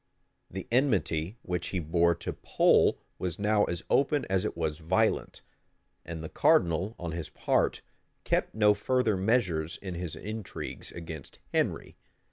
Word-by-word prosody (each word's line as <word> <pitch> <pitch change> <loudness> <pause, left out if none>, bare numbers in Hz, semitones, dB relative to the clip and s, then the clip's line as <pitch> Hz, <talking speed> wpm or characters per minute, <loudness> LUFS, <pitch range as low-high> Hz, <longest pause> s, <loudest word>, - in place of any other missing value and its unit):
The 95 0 -6
enmity 105 - +1
which 90 -1 -2
he 95 - -3
bore 85 +1 +2
to 85 - -5
Pole - - +3 0.2
was 90 -3 -3
now 105 0 +3
as 85 -1 -4
open 140 0 +2
as 95 +1 +2
it 105 - -3
was 80 -2 -2
violent; 95 +7 0 0.6
and 80 -1 -6
the - - -4
cardinal, 90 +5 +3
on 85 -2 -4
his 80 -1 -5
part, - - 0 0.4
kept - - 0
no 105 -1 +5
further 115 +1 +1
measures 95 -6 +1
in 95 -2 -6
his 85 -2 -5
intrigues 105 -1 -6
against 80 -4 -8 0.2
Henry. - - -1
90 Hz, 145 wpm, -29 LUFS, 85-105 Hz, 0.6 s, no